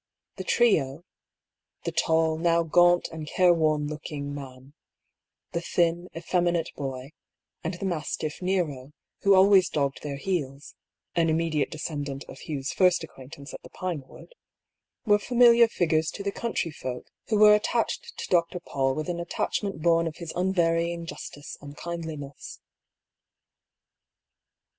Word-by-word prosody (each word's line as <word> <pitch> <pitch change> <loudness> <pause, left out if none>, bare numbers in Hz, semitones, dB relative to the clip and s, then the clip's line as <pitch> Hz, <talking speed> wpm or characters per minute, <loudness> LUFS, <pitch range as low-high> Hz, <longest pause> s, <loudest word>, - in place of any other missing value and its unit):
The 190 - -4
trio 165 - +2 0.4
— - - -52
the - - -1
tall, 160 -1 +2
now 170 0 +3
gaunt 175 +2 +4
and 160 -2 -7
careworn 155 -4 +3
looking, 150 -1 -5
man; 135 -1 -10 0.8
the 170 - -2
thin, 170 0 0
effeminate 175 0 0
boy, 135 0 -5 0.5
and 170 +2 -2
the 185 - -5
mastiff 155 -2 -3
Nero, 155 -8 -1 0.3
who 200 -1 +5
always 190 -1 +6
dogged 140 -2 -1
their 145 -2 -4
heels 145 -5 -3 0.4
(an 165 -1 +2
immediate 160 -2 +1
descend 150 -2 -4
ant 135 0 -6
of - - -12
Hugh's 140 -3 -4
first 180 -3 +3
acquaintance 140 0 -11
at - - -8
the - - -13
Pinewood) 175 - -6 0.4
— - - -60
were 205 -2 +5
familiar 235 0 +6
figures 160 -6 +1
to 200 - -5
the 200 - -1
country 220 -7 -2
folk, 130 -4 -6 0.2
who 215 - +1
were 210 0 +8
attached 460 - -1
to - - -5
Dr. 175 0 +1
Paull 135 -5 -1
with 155 0 -3
an 175 -1 -2
attachment 170 0 -2
bom 165 -1 +3
of 160 - -5
his 170 -3 -6
unvarying 170 -2 +1
justice 145 -3 -8
and 145 0 -10
kindliness. 160 -5 -7
165 Hz, 145 wpm, -27 LUFS, 145-180 Hz, 0.8 s, were